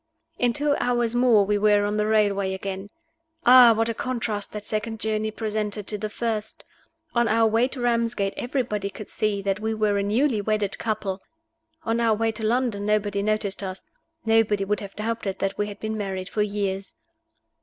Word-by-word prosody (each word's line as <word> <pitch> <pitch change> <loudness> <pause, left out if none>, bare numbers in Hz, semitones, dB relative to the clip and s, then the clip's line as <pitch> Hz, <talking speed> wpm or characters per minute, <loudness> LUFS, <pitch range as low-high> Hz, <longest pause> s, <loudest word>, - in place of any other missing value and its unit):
In 245 -1 +3
two 285 +4 +1
hours 240 -2 +1
more 240 -4 +4
we 205 +1 +1
were 205 0 +4
on 205 +1 -1
the 210 0 +1
railway 200 -3 +2
again. 195 +1 -5 0.6
Ah, 245 -1 +9
what 225 +1 +1
a 230 - -1
contrast 225 -4 -3
that 210 -1 -7
second 220 +1 -3
journey 215 0 -1
presented 215 -1 -3
to 210 - -3
the 215 +1 -3
first! 220 -1 -3 0.5
On 235 -1 +2
our 225 +1 +3
way 225 +3 +3
to 265 0 -7
Ramsgate 230 -4 0
everybody 240 -6 -2
could 200 +2 -10
see 205 -2 -1
that 195 0 0
we 220 +1 -2
were 210 -2 +1
a - - +1
newly 220 +3 +1
wedded 210 -1 -1
couple. 200 -3 -2 0.6
On 230 +1 0
our 230 -2 +3
way 225 +1 0
to 220 0 -7
London 230 -2 0
nobody 205 -1 0
noticed 210 -1 -1
us; 190 -1 -5 0.4
nobody 225 -3 +3
would 210 +1 0
have 200 -1 -9
doubted 215 -3 -3
that 195 0 -2
we 205 - +1
had 205 -1 -8
been 220 0 -3
married 190 -3 -4
for 215 - -1
years. 200 -2 -2
215 Hz, 185 wpm, -24 LUFS, 200-225 Hz, 0.6 s, Ah